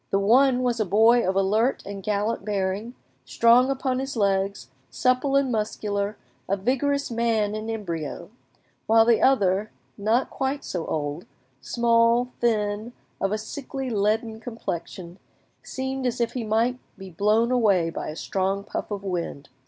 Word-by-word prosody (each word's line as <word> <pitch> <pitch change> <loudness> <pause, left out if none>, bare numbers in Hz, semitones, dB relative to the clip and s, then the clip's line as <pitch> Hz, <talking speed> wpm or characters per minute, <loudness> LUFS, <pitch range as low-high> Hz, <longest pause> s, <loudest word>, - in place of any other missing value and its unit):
The 195 - +2
one 250 +5 +4
was 245 -2 0
a - - +3
boy 225 +5 +5
of 190 - 0
alert 215 +6 +1
and 200 0 -6
gallant 210 +3 -1
bearing, 205 +3 -2 0.3
strong 235 - +4
upon 265 -1 -1
his 270 -1 -4
legs, 195 -1 0 0.2
supple 255 +2 +1
and 275 -2 +2
muscular, 210 -2 -2 0.3
a 195 - +1
vigorous 275 +6 0
man 225 -3 +1
in 215 +1 -4
embryo; 170 -5 -5 0.6
while 225 0 +5
the 235 -1 +4
other, 205 -5 +3 0.3
not 220 +5 +1
quite 270 +1 -2
so 175 -3 -4
old, 150 +2 -3 0.3
small, 235 +1 +2
thin, 215 0 0 0.3
of 195 - 0
a 215 - 0
sickly 265 +3 -6
leaden 220 +2 0
complexion, 185 -5 -6 0.4
seemed 265 0 -3
as 245 0 -2
if 235 - 0
he 250 - -3
might 230 +3 +1 0.2
be 190 -1 -10
blown 215 +7 +2
away 200 -9 +3
by - - -5
a 155 - -6
strong 195 +3 -1
puff 210 - -5
of 200 -2 -5
wind. 170 -6 -4
220 Hz, 150 wpm, -25 LUFS, 195-245 Hz, 0.6 s, boy